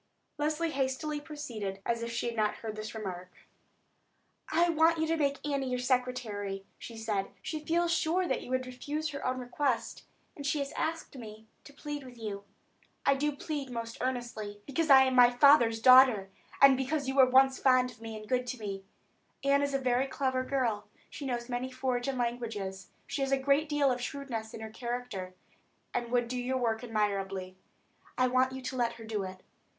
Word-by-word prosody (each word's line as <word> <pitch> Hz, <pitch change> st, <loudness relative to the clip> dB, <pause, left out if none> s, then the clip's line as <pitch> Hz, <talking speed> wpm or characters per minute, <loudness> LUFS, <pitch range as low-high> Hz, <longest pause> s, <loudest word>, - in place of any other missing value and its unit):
Leslie 310 Hz, +2 st, 0 dB
hastily 280 Hz, +2 st, -1 dB
proceeded, 235 Hz, -11 st, -5 dB
as 235 Hz, 0 st, 0 dB
if 235 Hz, 0 st, -3 dB
she 230 Hz, -, -2 dB
had 235 Hz, -1 st, -2 dB
not 215 Hz, -1 st, +1 dB
heard 220 Hz, -2 st, -6 dB
this 215 Hz, +1 st, -6 dB
remark. 185 Hz, -4 st, -6 dB, 1.2 s
"I 340 Hz, +2 st, +4 dB
want 330 Hz, 0 st, +4 dB
you 320 Hz, -, +1 dB
to 325 Hz, +1 st, +1 dB
make 285 Hz, -2 st, -1 dB
Annie 275 Hz, -2 st, -1 dB
your 250 Hz, -, 0 dB
secretary," 245 Hz, -6 st, -1 dB
she 230 Hz, -, -9 dB
said. 210 Hz, -3 st, -1 dB, 0.2 s
"She 310 Hz, -1 st, -4 dB
feels 340 Hz, +2 st, +1 dB
sure 350 Hz, +3 st, +1 dB
that -, -, -1 dB
you -, -, -10 dB
would 255 Hz, 0 st, 0 dB
refuse 290 Hz, +5 st, -4 dB
her 280 Hz, -1 st, -6 dB
own 255 Hz, 0 st, 0 dB
request, 250 Hz, 0 st, -2 dB, 0.3 s
and 285 Hz, -, -8 dB
she 290 Hz, +2 st, 0 dB
has 280 Hz, 0 st, -2 dB
asked 325 Hz, -2 st, -3 dB
me 220 Hz, -3 st, -10 dB, 0.2 s
to -, -, -12 dB
plead 290 Hz, 0 st, -6 dB
with 250 Hz, -2 st, -12 dB
you. 205 Hz, -3 st, -5 dB, 0.6 s
I -, -, +5 dB
do 295 Hz, +2 st, 0 dB
plead 285 Hz, -2 st, -4 dB
most 230 Hz, -1 st, -5 dB
earnestly. 245 Hz, -4 st, -2 dB
I 205 Hz, -, -6 dB
plead 205 Hz, -, -24 dB
because 310 Hz, +3 st, -1 dB
I 265 Hz, -1 st, +9 dB
am 260 Hz, 0 st, +1 dB
my 245 Hz, -1 st, +8 dB
father's 245 Hz, -3 st, +5 dB
daughter, 255 Hz, -5 st, +7 dB, 0.3 s
and 275 Hz, -1 st, +8 dB
because 275 Hz, +3 st, -1 dB
once -, -, -7 dB
you 265 Hz, -, -1 dB
were 265 Hz, 0 st, +7 dB
fond 255 Hz, -1 st, +4 dB
of 225 Hz, -, -18 dB
me 225 Hz, -1 st, -6 dB
and 215 Hz, 0 st, -10 dB
good 250 Hz, +1 st, 0 dB
to 255 Hz, -, -3 dB
me. 195 Hz, -2 st, -5 dB, 0.6 s
Annie 280 Hz, +1 st, +3 dB
is 280 Hz, -1 st, -2 dB
a -, -, +2 dB
very 255 Hz, 0 st, +1 dB
clever 260 Hz, -1 st, -1 dB
girl; 245 Hz, -6 st, -1 dB, 0.2 s
she 280 Hz, -, -6 dB
knows 240 Hz, -2 st, -2 dB
many 250 Hz, +1 st, -3 dB
foreign 255 Hz, 0 st, -2 dB
languages, 225 Hz, -6 st, -3 dB, 0.2 s
she 280 Hz, 0 st, -4 dB
has 270 Hz, 0 st, 0 dB
a 275 Hz, -, +4 dB
great 280 Hz, +3 st, +2 dB
deal 290 Hz, -2 st, +3 dB
of 250 Hz, 0 st, -2 dB
shrewdness 240 Hz, -4 st, -5 dB
in 225 Hz, -, -8 dB
her 220 Hz, 0 st, -7 dB
character, 235 Hz, -6 st, -5 dB, 0.6 s
and 240 Hz, -1 st, -2 dB
would 240 Hz, -1 st, +1 dB
do 250 Hz, +1 st, -3 dB
your 255 Hz, +1 st, -1 dB
work 230 Hz, -2 st, 0 dB
admirably. 195 Hz, -4 st, -2 dB, 0.6 s
I 255 Hz, -, +4 dB
want 255 Hz, +1 st, +2 dB
you 260 Hz, 0 st, -7 dB
to 260 Hz, -, -4 dB
let 240 Hz, -2 st, +1 dB
her 225 Hz, -, -11 dB
do 220 Hz, -2 st, -2 dB
it." 185 Hz, -1 st, -7 dB
255 Hz, 200 wpm, -31 LUFS, 225-275 Hz, 1.2 s, I